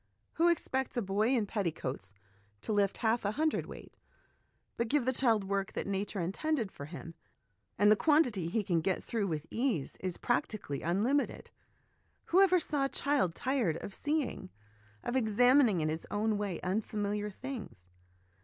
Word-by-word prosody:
Who 335 +2 +3
expects 265 -6 -1
a - - +2
boy 200 +3 +1
in 225 -4 +1
petticoats 155 - -3 0.5
to 220 - -2
lift 200 -1 +2
half 225 +2 +2
a 205 +1 0
hundredweight? 310 +3 -2 0.8
But 235 - -1
give 280 +1 +1
the 260 - +2
child 230 -5 +2
work 195 0 -2
that - - -3
Nature 200 +1 -2
intended 220 - -1
for 140 - -8
him, 165 +1 -8 0.6
and 205 +2 +5
he - - +7
quantity 250 - +3
he 210 +5 0
can 175 -4 +1
get 185 +3 -1
through 220 -4 -1
with 155 -3 -3
ease 230 - -1
is 185 -2 -3
practi 230 -2 0
cally 140 -6 -5
unlimited. 220 - 0 0.8
Whoever 375 0 +6
saw 290 -4 0
a - - -1
child 275 - +1
tired 250 - 0
of 200 - -7
seeing, 290 -10 -2 0.5
of 240 - -2
examining 245 - +4
in 155 - 0
his 160 +1 -4
own 215 +1 0
way, 200 -5 -2
unfamiliar 205 +1 -1
things 215 - -8
210 Hz, 160 wpm, -32 LUFS, 190-260 Hz, 0.8 s, he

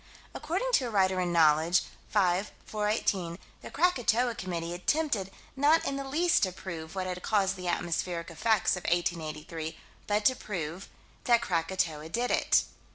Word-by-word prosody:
According - - -2
to 275 - +3
a - - -3
writer 190 -3 +2
in 175 -1 -1
Knowledge, 160 +1 +4 0.3
5 190 0 +1
418, 210 -5 -1 0.2
the - - -8
Krakatoa 250 -7 +2
Committee 175 -6 -4
attempted 215 - 0 0.3
not 295 +4 +4
in 275 - -1
the 275 - -3
least 320 +6 +2
to 185 - +2
prove 170 -2 -7
what 190 -1 -2
had 180 -1 -4
caused 195 -2 +1
the 180 -1 -6
atmospheric 170 0 -2
effects 215 +5 +2
of 180 - -6
1883, 160 -2 -2 0.3
but 210 0 0
to 255 - +5
prove 180 -4 -5 0.4
that 235 -1 +4
Krakatoa 165 -4 -1
did 240 +8 -1
it. - - +3
185 Hz, 155 wpm, -29 LUFS, 170-230 Hz, 0.4 s, to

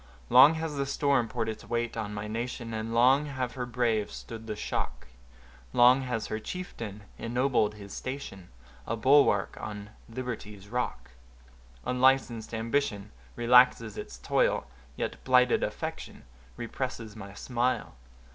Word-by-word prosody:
Long 155 +3 +9
has 160 -2 -3
the 140 0 -1
storm 140 -3 +2
poured 110 - -2
its 110 - -5
weight 120 0 -2
on 110 -2 -3
my 105 0 -5
nation, 115 +1 -4
And 110 +1 -3
long 130 +5 +4
have 130 -3 -3
her 125 -2 -4
braves 115 -3 0
stood 115 -1 -9
the 105 - -3
shock; - - -3 0.7
Long 125 +2 +6
has 125 -4 -2
her 110 - -3
chieftain 110 - -6 0.2
ennobled 120 -3 +1
his 100 -1 -10
station, 130 -9 -6 0.4
A 115 - -1
bulwark 125 -4 +4
on 105 -1 -7 0.2
liberty's 110 -5 -6
rock; 125 - -3 0.7
Unlicensed 125 -3 +2
ambition 110 -3 -1 0.2
relaxes 120 -2 +5
its - - -7
toil, - - +1 0.3
Yet - - -4
blighted 125 -1 +4
affection - - -5 0.3
represses 115 -2 -5
my 100 -2 -9
smile. 125 +3 -1
115 Hz, 135 wpm, -29 LUFS, 110-130 Hz, 0.7 s, Long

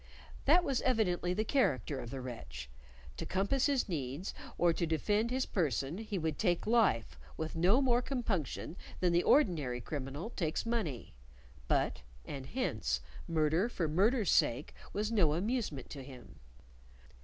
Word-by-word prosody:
That 340 +6 +6
was 275 -5 0
evidently 195 -8 +1
the 210 +4 0
character 145 - +1
of 120 -2 -6
the 135 +1 -5
wretch: - - -7 0.5
to - - -3
compass 200 +9 +1
his 280 -3 +2
ends 150 0 -3 0.2
or 175 -1 +4
to 170 0 -1
defend 205 +8 +1
his 260 +1 0
person 150 - -1
he 215 -2 -3
would 160 -3 -2
take 175 -4 +1
life 215 - +2 0.2
with 160 0 -4
no 185 +10 +4
more 245 -2 +3
compunction 205 - -2 0.2
than 180 -2 +2
the 170 - +5
ordinary 160 - +3
criminal 145 - -5
takes 160 -2 -2
money; 210 - -2 0.5
but - - +1 0.2
(and 135 -2 -6
hence) 110 - -1 0.3
murder 160 +6 +2
for 175 -8 -1
murder's 205 - +3
sake 125 +5 +2 0.2
was 210 +2 -1
no 170 -9 +3
amusement 200 - -2
to 140 - -6
him. 125 -5 -12
175 Hz, 150 wpm, -33 LUFS, 140-225 Hz, 0.5 s, That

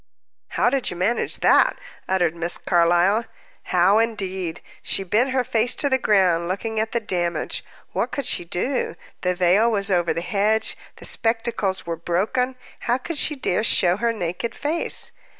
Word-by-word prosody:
"How - - +3
did 270 -2 0
you 175 - -6
manage 205 +7 0
that?" - - +4 0.3
uttered 175 -3 +1
Miss 170 +1 0
Carlyle. 175 +5 +2 0.4
How, 185 +4 +3
indeed? 190 -6 -2 0.2
She 195 - -1
bent 215 +8 +1
her 260 -1 +1
face 235 -1 +1
on 285 - +1
the 265 - +3
ground, 180 -7 +2
looking 215 +4 -3
at 220 0 -1
the 235 - 0
damage. 175 -6 -2 0.3
What - - -1
should 280 - -3
she 175 - +1
do? 185 +10 -2 0.3
The 180 0 0
veil 185 +6 +3
was 200 -3 0
over 175 -2 +2
the 170 - -2
hedge, 210 +4 0 0.2
the - - -8
spectacles 225 -4 0
were 170 -1 -4
broken 205 +10 -1 0.3
how 245 - +3
could 300 +3 -4
she 300 - +1
dare 215 -7 0
show 180 -4 +4
her 230 +2 +1
naked 180 +1 -4
face? 315 +4 +1
200 Hz, 170 wpm, -22 LUFS, 175-235 Hz, 0.4 s, that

